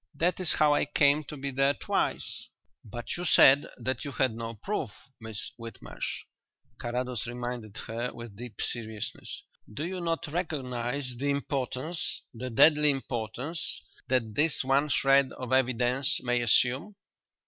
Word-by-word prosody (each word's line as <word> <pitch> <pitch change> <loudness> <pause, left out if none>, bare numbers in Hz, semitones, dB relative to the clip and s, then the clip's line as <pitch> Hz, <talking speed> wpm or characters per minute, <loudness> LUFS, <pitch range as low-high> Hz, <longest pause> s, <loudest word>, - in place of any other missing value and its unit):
That 175 +6 +1
is 180 -4 +2
how 150 -1 +4
I - - +2
came 145 +1 +4
to 150 - -7
be 140 0 -3
there 135 +2 +3
twice." - - -2 0.4
"But 120 +2 -5
you 175 - -4
said 140 -4 +7
that 130 +3 -2
you 145 - -4
had 130 -3 +2
no 115 0 -5
proof, 195 - -3 0.3
Miss 110 -2 -5
Whitmarsh," 115 0 -6 0.6
Carrados 125 -1 -2
reminded 120 -3 -5
her, 115 +2 -3
with 120 -3 -9
deep 120 -1 -9
seriousness. 110 -2 -4 0.3
"Do 145 +9 -3
you 185 +1 -4
not 165 -1 -1
recognize 135 -5 -2
the 140 +1 0
importance 135 +1 -2
the 125 +2 -5
deadly 150 +5 +6
importance 135 +4 -2 0.3
that 125 -4 +1
this 150 +4 +3
one 135 +3 +2
shred 135 -1 +4
of 130 0 -4
evidence 130 +1 +2
may 125 -1 +1
assume?" 130 - +2
130 Hz, 145 wpm, -29 LUFS, 120-145 Hz, 0.6 s, said